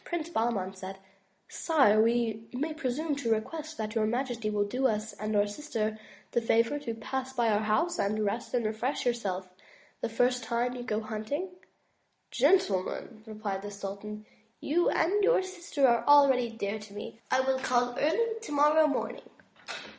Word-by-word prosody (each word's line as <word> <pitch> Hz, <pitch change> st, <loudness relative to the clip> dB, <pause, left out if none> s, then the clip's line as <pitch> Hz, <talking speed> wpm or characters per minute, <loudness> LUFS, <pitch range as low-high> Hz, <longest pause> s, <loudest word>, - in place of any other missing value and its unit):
Prince 340 Hz, -2 st, -3 dB
Bahman 220 Hz, -, -1 dB
said: 190 Hz, 0 st, -8 dB, 0.5 s
'*Sire, 265 Hz, -10 st, +3 dB
may 225 Hz, -1 st, +1 dB
we 300 Hz, +5 st, -2 dB
presume 300 Hz, +1 st, -2 dB
to 280 Hz, -5 st, -2 dB
request 310 Hz, +8 st, -2 dB
that 215 Hz, -1 st, -3 dB
your 220 Hz, -2 st, +1 dB
majesty 240 Hz, -2 st, -1 dB
will 210 Hz, -1 st, +1 dB
do 250 Hz, +6 st, +1 dB
us 215 Hz, -1 st, -2 dB
and 215 Hz, 0 st, -3 dB
our 205 Hz, 0 st, +4 dB
sister 215 Hz, -2 st, -3 dB, 0.3 s
the 235 Hz, -, +1 dB
favor 230 Hz, +5 st, +2 dB
to 235 Hz, -6 st, -4 dB
pass 260 Hz, +3 st, -4 dB
by 240 Hz, -3 st, +2 dB
our 210 Hz, -1 st, +3 dB
house 220 Hz, +12 st, +1 dB
and 215 Hz, +1 st, 0 dB
rest 230 Hz, +5 st, -2 dB
and 240 Hz, -2 st, +1 dB
refresh 220 Hz, +7 st, -2 dB
yourself 195 Hz, -7 st, -1 dB, 0.5 s
the -, -, -1 dB
first 245 Hz, +2 st, +1 dB
time 235 Hz, +2 st, 0 dB
you 250 Hz, -, -5 dB
go 220 Hz, -3 st, -2 dB
hunting?" 220 Hz, -, -3 dB, 0.8 s
"Gentlemen,'' 215 Hz, -, +1 dB
replied 210 Hz, -3 st, -4 dB
the 205 Hz, -, -6 dB
sultan, 205 Hz, +1 st, -7 dB, 0.3 s
"you 340 Hz, +4 st, +2 dB
and 400 Hz, +5 st, +2 dB
your 445 Hz, -2 st, +4 dB
sister 345 Hz, -7 st, 0 dB
are 235 Hz, -1 st, +3 dB
already 275 Hz, -4 st, +6 dB
dear 215 Hz, -2 st, -3 dB
to 210 Hz, -1 st, -12 dB
me. 210 Hz, +2 st, -8 dB
I 260 Hz, -, +3 dB
will 265 Hz, 0 st, +1 dB
call 245 Hz, -2 st, +1 dB
early 450 Hz, +9 st, +1 dB
tomorrow 305 Hz, -5 st, +4 dB
morning." 285 Hz, -, -2 dB
235 Hz, 165 wpm, -29 LUFS, 215-285 Hz, 0.8 s, already